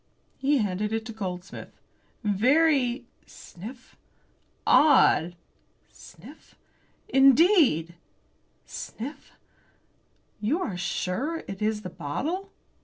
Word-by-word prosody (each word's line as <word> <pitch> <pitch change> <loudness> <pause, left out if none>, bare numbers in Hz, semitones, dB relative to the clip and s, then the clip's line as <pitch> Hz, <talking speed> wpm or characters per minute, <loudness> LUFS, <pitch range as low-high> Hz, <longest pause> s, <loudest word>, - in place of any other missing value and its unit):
He 280 +2 +2
handed 210 -2 -1
it 225 0 -2
to 230 - -6
Goldsmith. 185 -4 -7 0.4
"Very" 250 +4 +2 0.2
sniff! 230 +8 -12 0.7
"odd" 175 - +5 0.6
sniff! - - -15 0.5
"indeed" 270 - +4 0.7
sniff. 265 +7 -8 1.1
"You 235 - 0
are 210 - -3
sure 195 - -3
it 195 0 -7
is 210 0 -1
the 180 - -7
bottle?" 320 - -4
225 Hz, 85 wpm, -26 LUFS, 190-285 Hz, 1.1 s, odd